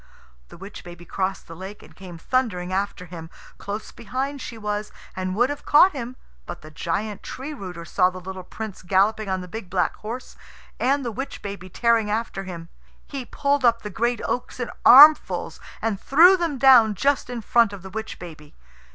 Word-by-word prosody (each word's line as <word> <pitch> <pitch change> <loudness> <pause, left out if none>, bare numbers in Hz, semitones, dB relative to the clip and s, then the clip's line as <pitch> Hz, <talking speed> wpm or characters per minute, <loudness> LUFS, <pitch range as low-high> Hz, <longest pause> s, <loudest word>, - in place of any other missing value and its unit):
The - - -13
witch 195 +4 -10
baby 175 0 -11
crossed 190 +2 -3
the 165 - -10
lake 190 +4 -9
and - - -17
came 180 -2 -10
thundering 185 -4 -1
after 195 -1 -2
him. 165 -2 -9 0.3
Close 205 +2 -6
behind 265 +4 -4
she 230 - -7
was, 210 -1 -4 0.2
and 185 0 -3
would 245 +6 +2
have 290 - -7
caught 335 +6 +6
him; 255 -3 -6 0.3
but - - -7
the 155 - -12
giant 200 +7 -3
Tree 280 +4 -7
rooter 180 - -8
saw 180 +2 +2
the 185 0 -9
little 190 +1 -7
Prince 210 +2 -8
galloping 200 +3 +1
on 190 -1 -1
the 180 - -8
big 200 0 -8
black 180 -1 0
horse, 235 +4 -7 0.4
and 275 +1 +1
the 235 - -2
witch 270 +3 -6
baby 195 -2 -7
tearing 230 +2 +2
after 210 -2 -3
him. 170 -2 -8 0.4
He 275 -3 -6
pulled 280 +1 0
up 235 -1 +3
the 210 - -6
great 235 +4 -1
oaks 245 - -3
in 245 - -3
armfuls, 295 +5 +7 0.2
and 215 -3 -1
threw 345 +7 +6
them 335 -6 -2
down 245 -5 +6
just 275 +4 +1
in 245 -2 -5
front 230 0 +3
of 200 -3 -9
the 190 - -9
witch 220 +2 -6
baby. 155 -4 -12
210 Hz, 195 wpm, -23 LUFS, 185-250 Hz, 0.4 s, armfuls